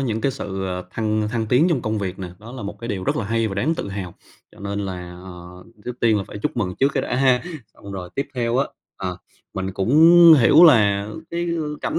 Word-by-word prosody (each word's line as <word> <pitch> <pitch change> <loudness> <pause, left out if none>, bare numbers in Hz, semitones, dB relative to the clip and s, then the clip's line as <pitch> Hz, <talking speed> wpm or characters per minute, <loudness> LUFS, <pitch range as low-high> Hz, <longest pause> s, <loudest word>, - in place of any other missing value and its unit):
những 115 -5 -2
cái 135 - 0
sự, 95 -7 -5
ờ, 90 -1 -4
thăng 110 0 -1
thăng 115 -1 -2
tiến 125 +9 +3
trong 150 -9 0
công 110 0 -2
việc 95 -2 -4
nè, 95 -2 -6
đó 115 +3 -12
là 130 -3 -8
một 100 - -7
cái 115 - -6
điều 95 -4 -3
rất - - 0
là 115 - -2
hay 115 +2 0
và 95 - -5
đáng 150 +12 0
tự 100 - -5
hào. 95 -3 -6 0.4
Cho - - -18
nên 100 0 -4
là, 90 -2 -6
ờ, 90 0 -11 0.2
trước 125 0 -7
tiên 115 -2 +3
là 100 - -4
phải 105 - -9
chúc 105 - -3
mừng 95 -5 -2
trước 135 - +4
cái - - 0
đã - - -2
ha! 130 -1 +3 0.3
Xong 100 - -11
rồi 90 -2 -7
tiếp 140 - -3
theo 120 -1 -1
á, 135 - +2 0.3
ờ, 90 -2 -4 0.4
mình 95 0 -3
cũng 100 +7 -1 0.5
hiểu 155 +8 +7
là 105 -9 +4 0.2
cái, 170 0 -2
ư, 160 -3 -3
cảnh - - -2
105 Hz, 250 wpm, -21 LUFS, 95-125 Hz, 0.5 s, hiểu